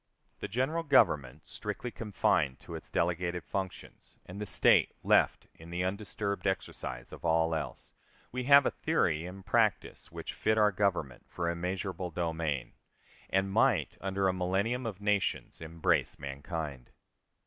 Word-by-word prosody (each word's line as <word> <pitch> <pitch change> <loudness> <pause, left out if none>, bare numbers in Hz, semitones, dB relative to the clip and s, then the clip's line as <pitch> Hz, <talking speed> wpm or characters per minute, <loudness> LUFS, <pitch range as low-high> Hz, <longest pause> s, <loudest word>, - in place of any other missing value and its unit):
The - - -4
General 130 - 0
Government, 105 - +3
strictly 125 - -5
confined 100 - 0
to - - -10
its - - -7
delegated 85 +1 0
functions, 95 -2 -6
and 95 +3 -8
the 105 - -3
State - - +4
left - - +3
in 80 +1 -13
the 90 +1 -2
undisturbed 100 +1 -2
exercise 90 -10 -4
of - - -10
all 80 0 +2
else, 80 - -5 0.4
we 125 0 -3
have 140 0 +8
a - - +2
theory 85 - 0
and 95 +1 -10
practice 110 -1 +1
which - - -6
fit 110 0 +1
our 105 -1 +5
Government 90 -10 -1
for 85 -1 -1
immeasurable 90 +2 -3
domain, 80 -5 -2 0.6
and 95 +1 +1
might, - - +3
under 95 0 0
a 95 - +2
millennium 100 +7 0
of 105 -3 -6
nations, 105 -4 0
embrace 80 0 0
mankind. 70 -1 -5
95 Hz, 145 wpm, -31 LUFS, 80-105 Hz, 0.6 s, have